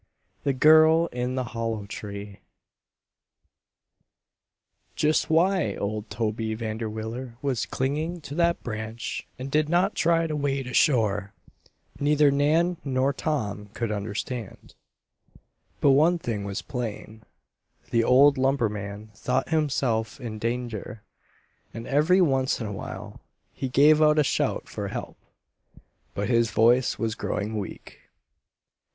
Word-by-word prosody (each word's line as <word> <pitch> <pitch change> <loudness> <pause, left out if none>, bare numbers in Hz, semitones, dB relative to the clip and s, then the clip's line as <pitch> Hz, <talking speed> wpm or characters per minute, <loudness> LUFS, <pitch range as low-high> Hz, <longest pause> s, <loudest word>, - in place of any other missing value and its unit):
THE 140 - +1
GIRL 160 +4 +6
IN 125 +1 -2
THE 130 - -1
HOLLOW 115 -3 -3
TREE 100 0 -8 2.6
Just 155 +1 +1
why 180 +2 +2
old 105 +1 -4
Toby 110 0 -2
Vanderwiller 110 +2 -5
was 135 -5 -1
clinging 155 +6 -2
to 145 - -8
that 170 +2 +1
branch 110 0 -5
and 135 +1 -6
did 155 +1 +2
not 175 +2 +2
try 165 0 +2
to 155 -2 -2
wade 140 -2 -1
ashore, 110 -6 +1 0.7
neither 145 0 +4
Nan 160 +5 +2
nor 135 0 +1
Tom 110 -10 -3
could 115 -2 -2
understand. 105 +2 -5 1.1
But 140 - +5
one 160 +6 +4
thing 110 -10 -4
was 100 -1 -4
plain: 110 -2 -6 0.7
the 115 -1 +3
old 135 +3 +5
lumberman 105 -6 -1
thought 125 +5 -1
himself 135 -8 0
in 115 -4 -6
danger, 115 -2 -4 0.7
and 115 0 -6
every 155 +7 +3
once 135 -5 +2
in 115 - -4
a 105 - -4
while - - -8 0.3
he 130 - -4
gave 150 +4 +5
out 150 0 +5
a 150 - +5
shout - - -1
for - - -5
help. - - -6 1.0
But 100 - -2
his 115 -2 +2
voice 120 +4 +3
was 115 -2 -1
growing 105 +1 -3
weak. 100 - -8
125 Hz, 125 wpm, -26 LUFS, 110-150 Hz, 2.6 s, GIRL